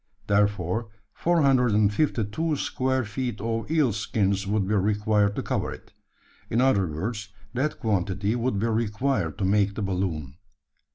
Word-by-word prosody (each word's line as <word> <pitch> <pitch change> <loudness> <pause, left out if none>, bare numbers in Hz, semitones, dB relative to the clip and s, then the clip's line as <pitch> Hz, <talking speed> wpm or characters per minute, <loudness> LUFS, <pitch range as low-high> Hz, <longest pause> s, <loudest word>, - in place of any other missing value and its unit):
Therefore 100 +1 +1 0.2
452 130 -2 +2
square 130 -2 -1
feet 115 +1 -3
of 115 +3 -2
eel 155 -8 +2
skins 100 -3 0
would 100 -1 0
be 105 - 0
required 105 0 +2
to - - -2
cover - - -1
it. - - -11 0.6
In 115 - +1
other 125 -8 +3
words, 105 +7 -4 0.3
that 135 +5 -1
quantity 100 0 0
would 120 -2 0
be 105 - 0
required 110 - 0
to 100 - -1
make 100 0 +2
the 105 - -3
balloon. 85 -7 -2
105 Hz, 135 wpm, -26 LUFS, 100-125 Hz, 0.6 s, other